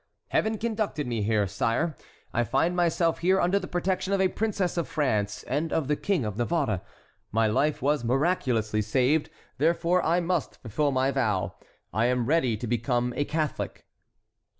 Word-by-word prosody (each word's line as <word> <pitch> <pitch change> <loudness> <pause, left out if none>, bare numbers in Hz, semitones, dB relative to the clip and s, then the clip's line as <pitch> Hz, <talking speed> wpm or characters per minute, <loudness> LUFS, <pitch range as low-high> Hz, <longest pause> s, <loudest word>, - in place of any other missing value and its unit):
Heaven 220 0 +1
conducted 215 -9 -2
me 120 -3 -2
here, 105 0 +2
sire. 115 - 0 0.4
I 120 - +2
find 135 - +1
myself 170 -1 +2
here 185 +3 +3
under 190 +3 +2
the 185 - -6
protection 185 +2 -1
of 195 - +2
a 190 -1 +3
princess 200 -4 -1
of 170 -2 -1
France 105 -8 -1
and 150 +4 -2
of 155 -5 0
the 150 - +2
King 185 - 0
of 105 -1 -4
Navarre; 120 - 0 0.5
my 115 +1 +2
life 140 +7 +1
was 145 -2 +2
miraculously 120 -5 +1
saved, 130 +8 +1 0.3
therefore 170 +3 +2
I 170 +2 +3
must 175 -2 -1
fulfil 140 +6 0
my 135 +1 +2
vow. 105 -8 0 0.4
I 115 +2 +2
am 125 -1 +1
ready 130 -6 +2
to 120 - -5
become 120 +1 0
a 145 - 0
Catholic." 155 -1 -3
145 Hz, 170 wpm, -27 LUFS, 115-175 Hz, 0.5 s, here